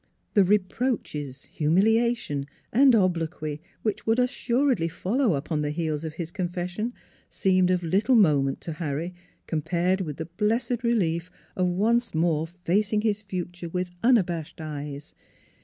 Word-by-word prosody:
The 205 - +6
reproaches, 185 - -1
humiliation, 195 -2 +1 0.3
and 260 +1 +6
obloquy 165 -6 0 0.2
which 215 -1 -2
would 225 +1 +3
assuredly 250 - +1
follow 200 - 0
upon 150 +2 -2
the 150 - -1
heels 155 -1 -2
of 160 -1 -5
his 165 -1 -5
confession 180 +4 -3 0.3
seemed 185 -1 +2
of 180 -1 +1
little 200 +9 +2
moment 145 - +3
to 165 - -5
Harry 155 +2 -3 0.3
compared 175 +4 0
with 155 -5 -4
the 160 - -4
blessed 225 +7 -1
relief 180 -7 +1 0.3
of 185 -1 +1
once 225 +5 +1
more 160 -1 +1
facing 195 +5 0
his 210 -1 0
future 175 -3 -5
with 180 +1 -2
unabashed 180 - +2
eyes. 150 -2 -6
180 Hz, 135 wpm, -26 LUFS, 160-215 Hz, 0.3 s, The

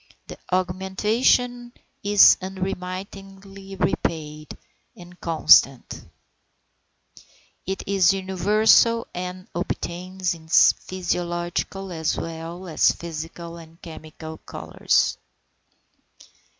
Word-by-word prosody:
The - - -11
augmentation 210 +7 0 0.3
is 205 0 +7
unremittingly 195 +1 -7
rapid 155 -4 -3 0.4
and 175 0 -14
constant; 140 -5 +3 1.6
it 190 0 -3
is 195 -2 +3
universal, 205 +5 +3
and 180 +1 -6
obtains 180 +1 -3
in 160 -1 -14
physiological 175 +2 0
as 160 -2 -2
well 165 +2 -6
as 160 - +3
in - - -1
physical 170 +1 -7
and 165 0 -14
chemical 160 -1 -10
colours. - - -1
180 Hz, 80 wpm, -23 LUFS, 170-195 Hz, 1.6 s, is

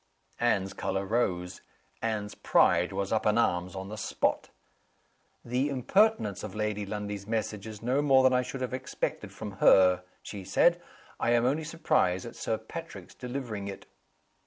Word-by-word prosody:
Anne's 100 -5 +1
color 95 +1 -2
rose. 95 -5 -1 0.4
Anne's 105 -2 -2
pride - - +3
was 100 -1 -2
up 110 - +1
in 105 +1 +3
arms 90 -5 +1
on 95 +1 -6
the 110 - -6
spot. - - -1 1.0
"The 125 +4 0
impertinence 140 - +2
of 105 -2 -7
Lady 105 -1 -2
Lundie's 105 -1 -5
message 110 -1 -2
is 110 0 -9
no 130 +4 +2
more 135 -2 +5
than 130 0 +5
I 125 - +4
should 130 +1 -6
have 130 0 -3
expected 130 0 -3
from 105 -3 -8
her," 90 -1 +6 0.2
she 100 -2 -7
said. 170 - +3 0.4
"I 120 - +2
am 120 0 +3
only 145 +5 +1
surprised 155 - +1
at 120 - -8
Sir 110 - -2
Patrick's 165 +10 -9
delivering 120 -6 -5
it." 100 - -7
110 Hz, 160 wpm, -29 LUFS, 100-130 Hz, 1.0 s, her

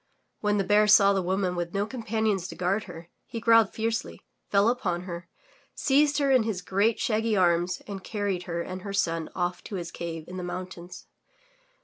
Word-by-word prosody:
When 210 0 +1
the 200 - +2
Bear 210 +2 +4
saw 200 -1 +7
the 195 - +1
woman 185 0 0
with 175 0 -4
no 200 +1 +1
companions 220 -5 -1
to - - -8
guard 190 +4 0
her, 165 +1 -10 0.2
he 230 - -5
growled 230 -2 +5
fiercely, 225 0 -3 0.3
fell 200 +1 +4
upon 185 -8 0
her, 175 -1 -7 0.5
seized 290 +1 +3
her 280 -2 +2
in 260 -2 +5
his 215 -5 -3
great, 200 +5 +1
shaggy 220 -1 +1
arms 175 0 +2
and 195 -2 -7
carried 200 -4 -2
her 170 0 -2
and 185 +1 -6
her 200 +1 -6
son 165 -5 0
off 180 -1 -2
to 205 - -6
his 175 -2 -5
cave 165 -2 -6
in 185 - -7
the 180 - -4
mountains. 180 0 -7
195 Hz, 195 wpm, -27 LUFS, 180-220 Hz, 0.5 s, saw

